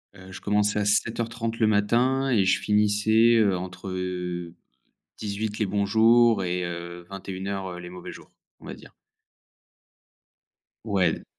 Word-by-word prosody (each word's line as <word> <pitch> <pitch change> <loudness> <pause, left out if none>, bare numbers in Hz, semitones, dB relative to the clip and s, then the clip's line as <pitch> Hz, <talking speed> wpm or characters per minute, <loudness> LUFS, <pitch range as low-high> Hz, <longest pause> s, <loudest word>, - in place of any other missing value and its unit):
Heu, 95 0 -13
je 95 - -9
commençais 105 0 +1
à 100 - 0
07:30 115 +2 -1
le 110 - +3
matin 120 +6 +2
et 105 -6 +3
je 95 - +3
finissais, 105 +2 +3
heu, 100 -4 +3
entre, 95 +1 -7
heu, 90 -2 -4 0.6
18:00 105 +1 -4
les 105 - +1
bons 100 +1 0
jours 115 0 +4
et 90 0 -2
heu, 85 0 -7
21:00 95 -1 -5
les 90 0 -9
mauvais 90 -1 -9
jours, - - -14 0.3
on - - -15
va - - -7
dire. - - -15 1.9
Ouais. 95 -6 0
100 Hz, 140 wpm, -25 LUFS, 90-110 Hz, 1.9 s, jours